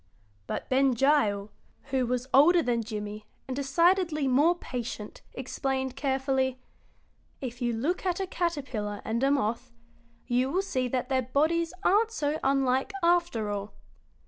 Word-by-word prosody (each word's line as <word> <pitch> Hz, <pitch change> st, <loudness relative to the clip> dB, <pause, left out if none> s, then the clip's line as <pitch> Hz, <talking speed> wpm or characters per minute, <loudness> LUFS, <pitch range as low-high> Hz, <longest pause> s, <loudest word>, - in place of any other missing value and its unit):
But -, -, -4 dB
Ben 265 Hz, 0 st, +3 dB
Gile, 220 Hz, -7 st, +2 dB, 0.4 s
who 260 Hz, -2 st, +1 dB
was 250 Hz, 0 st, -1 dB
older 330 Hz, +5 st, +6 dB
than 240 Hz, -1 st, +1 dB
Jimmie 210 Hz, -1 st, -6 dB, 0.2 s
and 260 Hz, -, -3 dB
decidedly 320 Hz, +2 st, +2 dB
more 290 Hz, +7 st, +4 dB
patient, 235 Hz, -7 st, -6 dB
explained, 265 Hz, 0 st, -2 dB
carefully: 265 Hz, -1 st, 0 dB, 0.8 s
"If 245 Hz, -1 st, -6 dB
you 240 Hz, -1 st, +1 dB
look 290 Hz, +11 st, -1 dB
at 365 Hz, -1 st, 0 dB
a 385 Hz, -, 0 dB
caterpillar 270 Hz, -, -3 dB
and 225 Hz, +2 st, -1 dB
a 270 Hz, -, +3 dB
moth 245 Hz, -2 st, 0 dB, 0.5 s
you 250 Hz, +2 st, +1 dB
will 370 Hz, +7 st, 0 dB
see 255 Hz, -9 st, -1 dB
that 250 Hz, +2 st, -2 dB
their 260 Hz, -1 st, +2 dB
bodies 315 Hz, +7 st, +1 dB
aren't 425 Hz, +4 st, +4 dB
so 310 Hz, -8 st, -2 dB
unlike, 270 Hz, +3 st, +2 dB
after 340 Hz, -12 st, +2 dB
all. 205 Hz, 0 st, -5 dB
265 Hz, 145 wpm, -28 LUFS, 245-305 Hz, 0.8 s, older